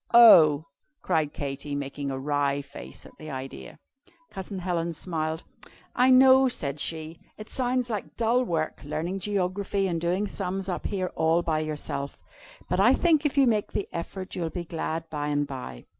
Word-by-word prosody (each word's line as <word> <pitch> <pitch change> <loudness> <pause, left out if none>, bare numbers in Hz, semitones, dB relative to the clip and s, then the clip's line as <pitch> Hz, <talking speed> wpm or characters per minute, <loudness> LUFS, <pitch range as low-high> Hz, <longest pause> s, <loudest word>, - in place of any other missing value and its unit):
"Oh!" 160 -10 +8 0.4
cried 155 -2 +1
Katy, 140 0 -4
making 140 0 -4
a 135 - -3
wry 140 0 0
face 140 +1 -10
at - - -12
the 155 - -8
idea. 130 - -7 0.5
Cousin 190 +1 -6
Helen 170 -2 -2
smiled. 160 -1 -3 0.5
"I 250 +1 +4
know," 260 +1 +7
said 145 - -3
she, 160 +1 -4 0.2
"it 215 - -10
sounds 250 -1 0
like 215 -4 -5
dull 235 +2 +2
work, 165 -8 -2
learning 160 +6 -3
geography 195 0 -1
and 170 -3 -2
doing 180 +4 0
sums 195 -1 -3
up 180 - -2
here 185 -3 -2
all 160 +2 +2
by 160 -2 0
yourself. 150 -2 -4 0.5
But - - 0
I - - +6
think 315 -4 +3
if 285 - -6
you 275 - +6
make 215 -4 +1
the 200 - -2
effort 185 +3 -5
you'll 170 -2 -2
be 170 +1 -5
glad 165 0 -3
by 145 -1 -2
and 145 0 +1
by. 125 - -8
170 Hz, 175 wpm, -27 LUFS, 145-200 Hz, 0.5 s, Oh